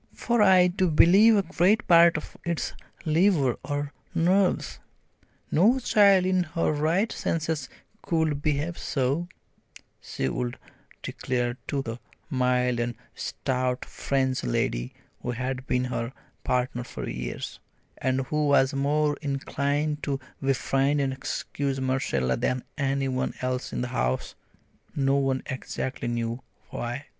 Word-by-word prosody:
"For 235 -2 +1
I 185 -3 +7
do 180 0 +1
believe 195 +8 +6
a 200 - +3
great 185 +5 +2
part 170 -1 +7
of 155 - -8
it's 170 -1 -2 0.3
liver 155 - +3
or 145 -1 -3 0.2
nerves! 180 +3 +2 0.7
No 215 +11 +5
child 200 -6 +5
in 185 0 +2
her 165 -1 0
right 160 +8 +1
senses 155 -4 -2 0.3
could 160 -4 0
behave 155 +3 -1
so," 140 +5 -1 0.7
she 65 - -3
would 120 - -3 0.5
declare 120 -1 -2
to 140 -1 -1
the 115 0 -5 0.3
mild 125 -2 +1
and 120 0 -1 0.2
stout 125 -1 -2
French 130 -2 -1
lady - - -1 0.3
who - - -4
had 130 +2 -3
been 125 0 +1
her 120 0 -3 0.3
partner 125 -1 0
for - - -7
years, 60 0 -5 0.4
and 130 +1 +1
who 150 +3 0
was 140 0 +4
more 145 +2 +1
inclined 145 +1 -1
to 140 -2 -2 0.2
befriend 135 +1 +1
and 135 -1 0
excuse 135 0 -3
Marcella 130 - 0
than 125 - -1
any 135 -1 0
one 130 -1 -2
else 125 0 -2
in - - -2
the 125 - -2
house 65 - -1 0.6
no 135 -1 +2
one 135 -1 0
exactly 130 -1 -4
knew 120 +1 -2 0.3
why. 120 +4 -4
140 Hz, 130 wpm, -26 LUFS, 125-160 Hz, 0.7 s, I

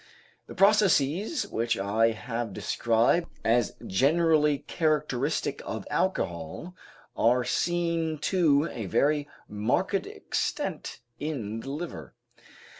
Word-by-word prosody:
The - - -10
processes 200 - +3
which 115 0 -1
I 105 +4 +2
have 115 -1 -4
described 120 - +1 0.2
as 115 0 +2
generally 150 - +2
characteristic 150 -3 -1
of - - -5
alcohol 85 - -2 0.4
are 125 +2 +3
seen 170 +2 0 0.2
to 155 -4 +4
a 110 -5 -5
very 145 - +1 0.2
marked 105 +1 0
extent - - -3 0.2
in 120 -8 -4
the 135 - -8
liver. 140 - -6
140 Hz, 100 wpm, -27 LUFS, 115-165 Hz, 0.4 s, to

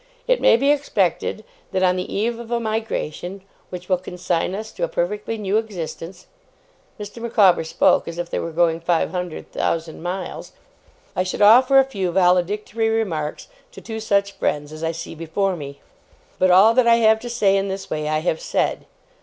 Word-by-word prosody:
It - - +2
may - - +6
be 275 +4 +3
expected 215 - 0 0.3
that 190 -1 0
on 180 0 +3
the 185 - -4
eve 230 +3 -1
of 235 -1 -9
a 240 0 0
migration 215 -5 -4 0.3
which 180 0 -8
will 185 -2 +1
consign 180 0 -2
us 220 +2 -6
to - - -6
a - - +2
perfectly 450 - -2
new 205 0 0
existence,' 180 -4 -6 0.7
Mr. 210 +3 -8
Micawber 205 -7 +4
spoke 160 - +2
as 170 0 -6
if 175 0 -3
they - - -3
were 165 - -3
going 165 0 +2
five 170 -1 0
hundred 180 -3 -5
thousand 165 -1 -2
miles, 180 +2 -5 0.6
'I - - +1
should 185 +2 -1
offer 255 +6 +7
a 270 - +8
few 195 -9 -3
valedictory 195 +5 +1
remarks 175 -10 -2 0.3
to - - -10
two 220 -1 -6
such 200 -2 +1
friends 150 -5 -2
as 155 +1 -8
I 165 - 0
see 165 0 -7
before 165 +4 -2
me. 140 -3 -9 0.6
But 185 - +4
all 195 +5 +6
that 250 0 +3
I 230 - +7
have 220 -1 +4
to 240 - -7
say 210 -5 +2
in 195 0 0
this 195 0 -6
way, 150 -1 -2
I 155 0 0
have 160 -1 -1
said. - - -1
195 Hz, 190 wpm, -21 LUFS, 170-225 Hz, 0.7 s, a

